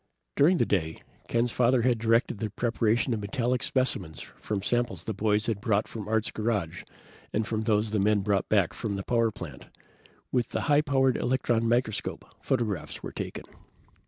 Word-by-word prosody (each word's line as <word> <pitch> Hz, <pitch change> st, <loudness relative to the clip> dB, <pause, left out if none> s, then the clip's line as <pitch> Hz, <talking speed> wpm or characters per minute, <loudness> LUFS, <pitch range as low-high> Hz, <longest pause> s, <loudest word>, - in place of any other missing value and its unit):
During 170 Hz, +6 st, +5 dB
the -, -, +3 dB
day, 80 Hz, -5 st, -1 dB, 0.2 s
Ken's 120 Hz, 0 st, +1 dB
father 125 Hz, 0 st, +3 dB
had 120 Hz, -2 st, +2 dB
directed 115 Hz, -1 st, +2 dB
the 110 Hz, -, -2 dB
preparation 115 Hz, +2 st, +1 dB
of 110 Hz, -, -1 dB
metallic 125 Hz, +2 st, -1 dB
specimens 100 Hz, -, -1 dB
from 100 Hz, -3 st, -5 dB
samples 120 Hz, -6 st, 0 dB
the 110 Hz, -, -3 dB
boys 105 Hz, +1 st, +1 dB
had 110 Hz, -4 st, -2 dB
brought 105 Hz, -1 st, +1 dB
from 105 Hz, -3 st, -7 dB
Art's 110 Hz, 0 st, 0 dB
garage 100 Hz, -7 st, -2 dB, 0.5 s
and 110 Hz, +1 st, 0 dB
from 110 Hz, 0 st, -2 dB
those 105 Hz, -1 st, +1 dB
the 110 Hz, -, +1 dB
men 105 Hz, +1 st, +3 dB
brought 100 Hz, -1 st, 0 dB
back 100 Hz, -5 st, +3 dB
from 105 Hz, -3 st, -3 dB
the 100 Hz, -, -4 dB
power 115 Hz, 0 st, +2 dB
plant. 105 Hz, -, -9 dB, 0.6 s
With 125 Hz, -2 st, 0 dB
the -, -, -2 dB
high 150 Hz, -1 st, +4 dB
powered 135 Hz, -3 st, +2 dB
electron 120 Hz, -2 st, +1 dB
microscope, 120 Hz, -3 st, -1 dB
photographs 110 Hz, -, -2 dB
were -, -, -5 dB
taken. -, -, -6 dB
110 Hz, 175 wpm, -28 LUFS, 105-120 Hz, 0.6 s, During